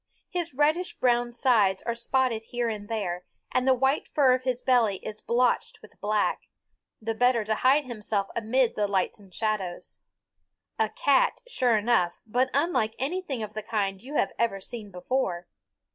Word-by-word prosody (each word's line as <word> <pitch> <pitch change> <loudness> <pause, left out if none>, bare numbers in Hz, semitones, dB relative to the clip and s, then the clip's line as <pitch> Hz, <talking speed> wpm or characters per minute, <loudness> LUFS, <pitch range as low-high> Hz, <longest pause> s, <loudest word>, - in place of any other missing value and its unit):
His 340 -6 -3
reddish 310 +6 +1
brown 240 -1 +2
sides 225 -6 +2
are 235 - -1
spotted 235 -1 0
here 240 0 -2
and 210 -2 -6
there, 180 -6 -2 0.3
and 255 +1 +1
the 260 - +6
white 265 +3 +1
fur 270 -4 +4
of 255 0 -1
his 250 -2 0
belly 240 -7 +3
is 215 0 -6
blotched 245 +1 +1
with 215 - -17
black 210 0 0 0.5
the 225 0 -2
better 245 0 +3
to 215 +1 0
hide 265 +6 +3
himself 215 -4 -2
amid 235 +2 +1
the 210 -1 +1
lights 195 +1 0
and 195 -2 -18
shadows. 200 -3 -3 0.8
A 220 -1 +2
cat, 275 +3 +2
sure 250 - +2
enough, 210 -5 +1
but 250 +4 +1
unlike 280 -7 +1
anything 280 -4 -2
of 210 0 -7
the 215 - -4
kind 200 -3 -2
you 275 +5 -8
have - - +2
ever 225 -4 +1
seen 210 +1 -7
before. 180 -1 -2
235 Hz, 170 wpm, -27 LUFS, 210-255 Hz, 0.8 s, the